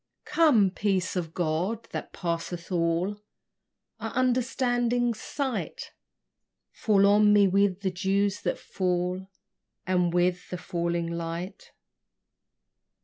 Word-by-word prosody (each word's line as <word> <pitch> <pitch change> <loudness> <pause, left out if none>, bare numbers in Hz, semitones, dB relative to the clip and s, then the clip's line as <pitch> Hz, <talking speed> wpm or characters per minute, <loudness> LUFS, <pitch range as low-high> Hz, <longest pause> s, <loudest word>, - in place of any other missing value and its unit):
Come, 295 - +4
peace 190 -2 -1
of 170 -3 -2
God, 180 +6 -1
that - - -5
passeth 170 +1 -4
all 175 +4 0 0.8
Our - - -4
understanding's 245 -2 +1
sight: 270 -4 -4 0.8
Fall 200 -2 +3
on 210 +1 +5
me 205 -1 +6
with 195 0 +2
the 190 -2 0
dews 195 +2 0
that - - -1
fall, 180 0 -2 0.6
And 180 -2 +1
with 180 +1 0
the 180 - -4
falling 170 -2 -2
night. 170 +3 -6
190 Hz, 105 wpm, -27 LUFS, 175-210 Hz, 0.8 s, me